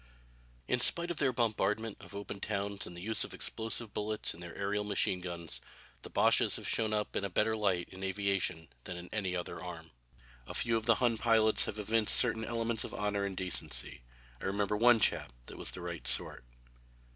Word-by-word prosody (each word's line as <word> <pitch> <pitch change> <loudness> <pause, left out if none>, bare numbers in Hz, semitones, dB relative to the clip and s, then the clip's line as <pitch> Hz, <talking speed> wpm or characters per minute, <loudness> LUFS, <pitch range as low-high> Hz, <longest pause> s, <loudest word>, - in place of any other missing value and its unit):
In 125 - +1
spite 170 +7 +5
of 170 - -5
their 135 -3 +2
bombardment 110 -2 0
of - - -12
open 100 0 -6
towns 100 -1 -3
and 85 - -10
the 90 - -8
use 110 +2 0
of - - -7
explosive 110 -1 -1
bullets 105 +1 -1
in 85 - -14
their 85 -1 -9
aërial 100 +1 -1
machine 100 -2 0
guns, 85 -2 -5 0.4
the - - -10
Boches - - +3
have - - -6
shown 110 -2 0
up 105 -1 -2
in - - -1
a 100 - -2
better 110 +5 +1
light 95 -5 0
in 95 +1 -9
aviation 95 -4 -1 0.2
than 90 - -5
in 85 +1 -9
any 95 -4 -2
other 90 - -5
arm. 85 -3 -8 0.6
A - - -7
few 115 -1 +1
of 110 0 -2
the 115 - +6
Hun 115 -2 +1
pilots 110 -2 +4
have 105 - -4
evinced 110 +1 +3
certain 115 -2 +5
elements 115 0 -1
of - - -6
honor 105 -1 -1
and 95 -2 -5
decency. 90 -8 0 0.4
I - - -5
remember 100 +1 0
one 115 +2 +5
chap 80 - +3
that - - -10
was - - -1
the 90 - -7
right 85 -8 -5
sort. 65 -1 +2
105 Hz, 205 wpm, -32 LUFS, 90-110 Hz, 0.6 s, the